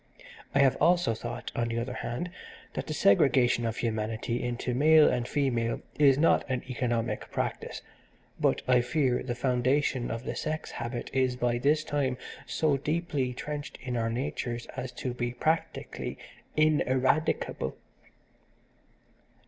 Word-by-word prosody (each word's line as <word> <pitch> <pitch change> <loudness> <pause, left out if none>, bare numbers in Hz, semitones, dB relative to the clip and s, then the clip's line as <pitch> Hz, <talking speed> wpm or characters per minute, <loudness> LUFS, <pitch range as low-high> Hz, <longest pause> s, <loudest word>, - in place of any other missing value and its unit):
I - - +6
have 135 -2 +4
also 175 -5 +4
thought, 110 - -6
on 120 0 0
the 115 0 -2
other 120 +2 -2
hand, 130 +9 -4 0.4
that - - -4
the 155 - -2
segregation 120 +2 +4
of 115 - -3
humanity 110 +1 -2
into 120 0 -2
male 155 +4 +6
and 120 -1 0
female 120 -5 0 0.2
is 140 -3 +6
not 165 +3 +4
an 130 -1 -1
economic 120 -2 -2
practice, - - -3 0.6
but - - +2
I 125 -1 +5
fear 130 -1 +1
the 120 -2 -3
foundation 130 +1 +1
of 115 +1 -4
the - - -4
sex 155 0 -3
habit 120 0 -5
is 130 -1 +2
by 120 -1 0
this 150 +4 +3
time 140 -4 -1 0.3
so 150 -3 +1
deeply 145 -2 -1
trenched 150 +2 -5
in 125 -2 -3
our 115 -1 0
natures 120 -1 -3
as 125 - -4
to 125 - -4
be 120 0 -2
practically 160 +6 -2 0.4
ineradicable. 145 - +1
125 Hz, 140 wpm, -29 LUFS, 120-145 Hz, 0.6 s, I